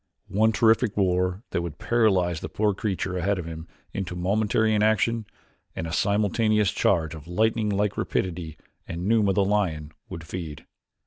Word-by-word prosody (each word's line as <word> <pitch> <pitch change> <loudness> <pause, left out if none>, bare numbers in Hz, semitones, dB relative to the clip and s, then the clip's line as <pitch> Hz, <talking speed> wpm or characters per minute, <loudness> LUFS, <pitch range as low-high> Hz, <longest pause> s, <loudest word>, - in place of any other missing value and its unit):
One 110 +3 +3
terrific 110 0 +3
roar 90 +1 +1
that - - 0
would 85 -4 -6
paralyze 95 -8 +2
the - - -6
poor 105 -1 +1
creature 95 -2 -2
ahead 100 +3 0
of 90 - -4
him 80 0 -7 0.3
into 90 -3 -4
momentary 105 +4 +1
inaction, 110 +1 +2 0.5
and - - -3
a 80 - -5
simultaneous 105 +1 +2
charge 80 -2 +1
of 80 -1 -10
lightning 110 +4 +1
like 100 0 0
rapidity 85 -4 -2 0.3
and 85 +2 -5
Numa, 105 -2 +3
the 100 +1 +2
lion, 85 -7 0 0.2
would 80 - -7
feed. 80 -4 -7
95 Hz, 155 wpm, -25 LUFS, 85-110 Hz, 0.5 s, One